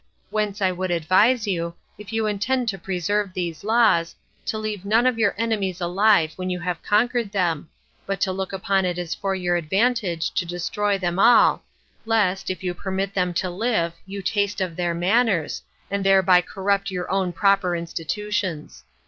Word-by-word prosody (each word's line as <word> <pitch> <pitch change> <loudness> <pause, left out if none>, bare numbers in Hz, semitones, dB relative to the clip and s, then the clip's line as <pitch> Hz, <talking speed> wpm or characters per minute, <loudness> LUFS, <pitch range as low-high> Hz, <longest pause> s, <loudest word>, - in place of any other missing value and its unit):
Whence 210 -1 -1
I 185 - +3
would 185 +1 -3
advise 190 +8 +3
you, 170 -4 -2 0.2
if 210 0 -11
you 225 -1 0
intend 230 +5 0
to 195 -2 -4
preserve 195 +1 -1
these 170 -2 -4
laws, 215 -6 +3 0.3
to 220 - -1
leave 215 -3 -4
none 220 +4 +3
of 250 -3 +2
your 210 -3 +2
enemies 205 -5 -1
alive 180 -2 +3
when 185 0 -3
you 180 -1 -2
have 180 -1 -3
conquered 230 0 +1
them, 170 -6 -1 0.4
but 195 -1 -2
to 190 - +2
look 190 0 -4
upon 195 0 0
it 180 -1 -1
as 175 -2 -3
for 195 +2 -2
your 175 -2 0
advantage 190 0 0
to - - 0
destroy 180 +4 -1
them 180 -1 -2
all, 240 +4 +5 0.5
lest, 200 -4 +1
if 185 0 -4
you 180 -1 -1
permit 190 +2 -3
them 180 -2 0
to 185 - 0
live, 180 -4 0
you 195 0 -6
taste 205 +1 0
of 185 -3 -2
their 175 -1 -1
manners, 190 -1 +1 0.3
and 200 0 -1
thereby 190 -2 +5
corrupt 200 +2 -1
your 180 -2 -4
own 190 -2 0
proper 195 0 +2
institutions. 170 +1 -4
195 Hz, 175 wpm, -23 LUFS, 180-210 Hz, 0.5 s, all